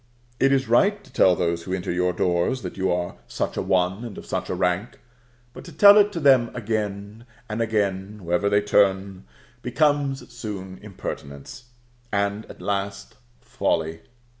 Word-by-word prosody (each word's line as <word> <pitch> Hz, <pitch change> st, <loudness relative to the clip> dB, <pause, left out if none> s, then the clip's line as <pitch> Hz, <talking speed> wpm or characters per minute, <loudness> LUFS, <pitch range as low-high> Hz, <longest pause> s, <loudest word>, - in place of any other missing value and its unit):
It 135 Hz, +1 st, +4 dB
is 135 Hz, -1 st, +2 dB
right 200 Hz, -, +3 dB
to -, -, -20 dB
tell 90 Hz, -1 st, +5 dB
those 85 Hz, -1 st, -1 dB
who 95 Hz, +2 st, -3 dB
enter 90 Hz, -2 st, -4 dB
your 90 Hz, +1 st, +1 dB
doors 90 Hz, +7 st, 0 dB
that 90 Hz, -, -6 dB
you 95 Hz, -1 st, 0 dB
are 90 Hz, 0 st, -2 dB
such -, -, -3 dB
a -, -, -1 dB
one, 95 Hz, +4 st, 0 dB
and 115 Hz, -5 st, -8 dB
of -, -, -9 dB
such -, -, -3 dB
a -, -, -1 dB
rank; 90 Hz, +5 st, -1 dB, 0.5 s
but -, -, -10 dB
to 170 Hz, -, -10 dB
tell 200 Hz, +6 st, +8 dB
it 210 Hz, 0 st, +5 dB
to 170 Hz, -, -3 dB
them 130 Hz, -6 st, +5 dB
again 105 Hz, 0 st, -4 dB, 0.2 s
and 110 Hz, 0 st, -3 dB
again, 105 Hz, -2 st, -1 dB
wherever 90 Hz, +4 st, +1 dB
they 100 Hz, 0 st, +3 dB
turn, 95 Hz, -2 st, +1 dB, 0.4 s
becomes 140 Hz, -1 st, 0 dB
soon 100 Hz, -5 st, -7 dB
impertinence, 90 Hz, -, -8 dB, 0.5 s
and 100 Hz, +1 st, -1 dB
at -, -, -12 dB
last 100 Hz, 0 st, -3 dB, 0.3 s
folly. 80 Hz, 0 st, -1 dB
100 Hz, 165 wpm, -24 LUFS, 95-120 Hz, 0.5 s, tell